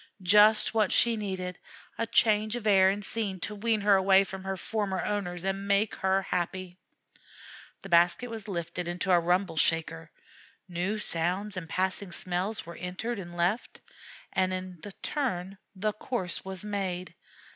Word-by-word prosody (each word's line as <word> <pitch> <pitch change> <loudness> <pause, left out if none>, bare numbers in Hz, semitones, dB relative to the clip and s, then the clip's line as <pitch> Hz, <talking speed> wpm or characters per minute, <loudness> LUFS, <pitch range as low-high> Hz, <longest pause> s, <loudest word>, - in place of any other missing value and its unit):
"Just 210 +4 +5
what 215 -3 +2
she 235 -1 +4
needed: 190 -4 -4 0.4
a 230 - -2
change 215 +1 +3
of 240 -3 -5
air 190 -2 +6
and 200 +1 -2
scene 200 -4 -2
to 210 - -3
wean 215 +1 0
her 200 0 +5
away 190 0 +5
from 190 0 -8
her 190 0 -2
former 200 -1 -2
owners 180 -4 -2
and 195 +1 -2
make 200 +2 +2
her 190 0 +1
happy." 180 0 -3 1.1
The 195 - -9
basket 175 +8 +3
was 220 -2 -6
lifted 175 -2 -4
into 180 +2 -1
a 175 - +6
Rumble 175 0 0
shaker. 155 - +1 0.6
New 180 +4 -2
sounds 190 +2 -1
and 170 -3 -6
passing 190 0 -1
smells 185 +4 -2
were 170 - -9
entered 195 +6 -4
and 175 -2 -8
left. 180 +7 0 0.6
A 185 0 0 0.3
turn 235 -12 -1
in 195 - -15 0.2
the 210 +3 -1
course 210 -4 -3
was 190 +1 -5
made. 190 -3 -3
190 Hz, 155 wpm, -29 LUFS, 180-210 Hz, 1.1 s, air